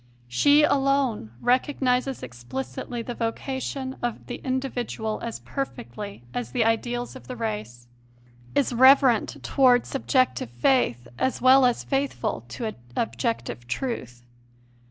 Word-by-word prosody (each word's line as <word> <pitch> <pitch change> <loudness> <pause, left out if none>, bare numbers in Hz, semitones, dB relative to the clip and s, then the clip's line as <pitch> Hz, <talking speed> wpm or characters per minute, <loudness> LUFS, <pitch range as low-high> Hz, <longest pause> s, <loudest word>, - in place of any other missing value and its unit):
She 285 - +5
alone 275 - +2
recognizes 255 0 +1
explicitly 130 - -5
the 245 - -5
vocation 260 +3 -3
of 240 -2 -3
the - - -5
individual 250 -4 -2
as 230 -1 -5
perfectly 200 - -6
as 120 -2 -3
the 225 - +2
ideals 240 +2 -1
of 260 - -12
the 255 - -5
race; 210 - -4 0.7
is 280 -3 +2
reverent 260 -1 +5
towards 250 -3 +4
subjective 260 - +1
faith 120 - +1
as 260 - 0
well 260 +1 +7
as 245 - -1
faithful 275 0 -2
to 225 -3 -4 0.2
objective 115 +1 -2
truth. 125 - -4
240 Hz, 115 wpm, -25 LUFS, -, 0.7 s, well